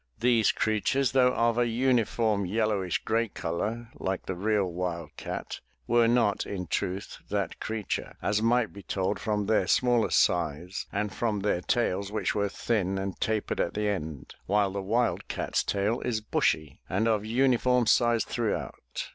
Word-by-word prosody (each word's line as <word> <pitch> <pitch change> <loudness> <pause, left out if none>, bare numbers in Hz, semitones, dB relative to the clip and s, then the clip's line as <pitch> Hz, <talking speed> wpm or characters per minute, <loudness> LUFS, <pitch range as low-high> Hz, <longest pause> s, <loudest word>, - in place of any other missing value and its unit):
These 120 -2 +4
creatures, 115 +5 +1
though 125 -1 +4
of 115 0 +2
a 120 - +3
uniform 115 -3 +1
yellowish 100 -2 0
gray 115 +1 +1
color 110 +6 -3
like 95 0 -3
the - - -2
real 100 +2 +1
wild 85 -3 -4
cat - - -5 0.3
were 120 0 +4
not 115 -3 +2
in 95 -2 -5
truth 95 +3 -3
that 100 -4 -2
creature, 110 -2 -3
as 105 +1 0
might 115 0 +2
be 100 - -9
told 95 +1 -2
from 105 -2 -1
their 110 +1 +2
smaller 120 -3 +3
size 85 +1 +1
and 100 0 -2
from 105 -2 -1
their 95 -3 0
tails 100 -2 0
which 105 -3 -1
were 100 -1 0
thin 95 -3 -1
and 95 0 -4
tapered 110 -1 -1
at - - -1
the 105 0 0
end, 80 -8 -4
while 100 0 +2
the 100 0 -3
wildcat^s 115 +4 0
tail 105 +4 0
is 115 -3 -1
bushy 80 -8 0
and 100 +5 +1
of 110 -2 +2
uniform 125 +1 +2
size 120 +1 +3
throughout. 105 - -3
105 Hz, 160 wpm, -28 LUFS, 95-115 Hz, 0.3 s, These